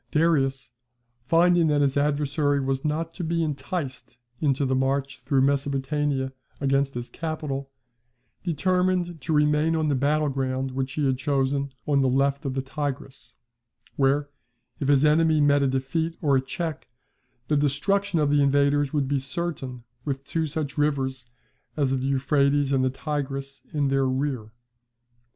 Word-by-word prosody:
Darius, 135 -5 +1 0.6
finding 170 +1 +4
that 150 -1 +2
his 140 -2 +2
adversary 145 0 +1
was 135 0 -1
not 160 +2 -2
to 180 - -5
be 165 0 0
enticed 140 -4 -4 0.2
into 140 -2 +1
the 130 - 0
march 135 +1 0
through 135 +1 +1
Mesopotamia 140 0 0 0.3
against 135 -1 +1
his 120 0 -5
capital, 150 -4 -4 0.7
determined 180 0 0
to 135 - -4
remain 150 +1 +3
on 155 -1 +1
the - - +2
battle 145 +3 +1
ground 130 -1 -2
which 135 +1 -3
he 150 - 0
had 130 -2 +1
chosen 140 0 0
on 140 -2 +2
the 130 - +3
left 140 +3 +1
of 135 -1 -2
the 135 - -1
Tigris; 135 -1 -5 0.6
where, 140 +1 +1 0.5
if 140 - -2
his 140 0 +4
enemy 155 +1 +4
met 145 -1 +4
a 140 - +3
defeat 150 +6 -1
or 145 -3 +2
a 130 - +3
check, 155 +3 -5 0.6
the 150 - +2
destruction 170 +7 +1
of 150 -2 +2
the 145 0 +4
invaders 140 0 +3
would 145 -3 0
be 140 0 +1
certain 135 -3 -4 0.2
with 135 -1 -3
two 160 +2 -1
such 145 -3 -3
rivers 130 -4 0 0.5
as 140 -3 +1
the 135 0 0
Euphrates 140 +1 +2
and 135 -1 +2
the 130 - +2
Tigris 135 -1 -4
in 145 -2 0
their 135 -1 +2
rear. 130 -4 -2
140 Hz, 155 wpm, -25 LUFS, 135-150 Hz, 0.7 s, finding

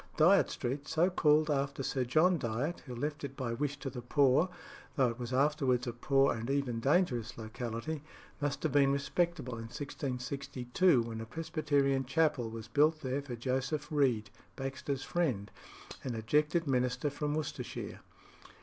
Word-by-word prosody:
Dyot 180 +6 +6
Street, 140 +4 -3
so 175 +4 +2
called 155 -2 +4
after 140 -1 -1
Sir 130 -1 0
John 160 +8 +4
Dyot, 125 +8 -2
who 125 - -6
left 145 +5 -3
it 140 -1 -6
by 120 -3 -2
wish 145 +3 -2
to 135 - -3
the 125 -1 -6
poor, 140 +6 +3 0.5
though 130 -3 +3
it 115 +2 -6
was 120 0 -4
afterwards 135 -2 +2
a 120 - -3
poor 135 +3 +3
and 115 +2 -5
even 135 -4 0
dangerous 130 - +1
locality, 115 +6 -4 0.4
must 145 -1 -1
have 155 - +1
been 140 0 +4
respectable 140 0 -1
in 115 - -6
1662, 135 +2 0
when 115 -1 -5
a 110 - -7
Presbyterian 145 -2 0
chapel 140 -3 +1
was 110 -1 -7
built 155 +2 +3
there 130 +2 -1
for 135 -4 -6
Joseph 130 +5 -2
Read, 125 -9 +2 0.2
Baxter's 135 0 -3
friend, 135 - -1 0.5
an 125 -3 -3
ejected 150 +9 +1
minister 125 +1 0
from 150 +1 -2
Worcestershire. 155 -2 -4
135 Hz, 160 wpm, -32 LUFS, 125-150 Hz, 0.5 s, Dyot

